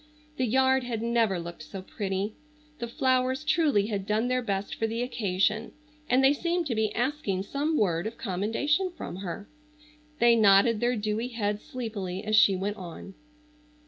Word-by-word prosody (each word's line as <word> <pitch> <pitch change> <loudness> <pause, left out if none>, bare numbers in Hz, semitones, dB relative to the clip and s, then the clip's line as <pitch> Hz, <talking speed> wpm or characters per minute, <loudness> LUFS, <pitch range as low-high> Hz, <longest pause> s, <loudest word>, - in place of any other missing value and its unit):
The 255 - +1
yard 265 +2 +3
had 230 -2 -3
never 230 -5 +1
looked 170 -1 -8
so 185 +4 -8
pretty. 195 +1 -3 0.5
The 235 - -3
flowers 260 +3 +1
truly 300 -10 +2
had 200 -3 -3
done 215 +4 +1
their 255 0 +1
best 200 -3 -2
for 225 - -1
the 230 +2 -2
occasion, 215 -2 0 0.4
and 255 +2 +4
they 270 +1 +6
seemed 340 +3 -1
to 270 - -1
be 220 -1 0
asking 240 -7 -1
some 295 +8 -1
word 175 -2 +1
of 225 - -7
commendation 230 - 0
from - - -6
her. 195 +1 -6 0.7
They 235 0 +5
nodded 210 +1 +5
their 245 +2 +1
dewy 215 +2 -2
heads 210 -4 -2
sleepily 205 -6 -5
as 215 0 +1
she 200 -2 +6
went 200 +3 -3
on. 185 +1 -9
220 Hz, 170 wpm, -28 LUFS, 200-255 Hz, 0.7 s, they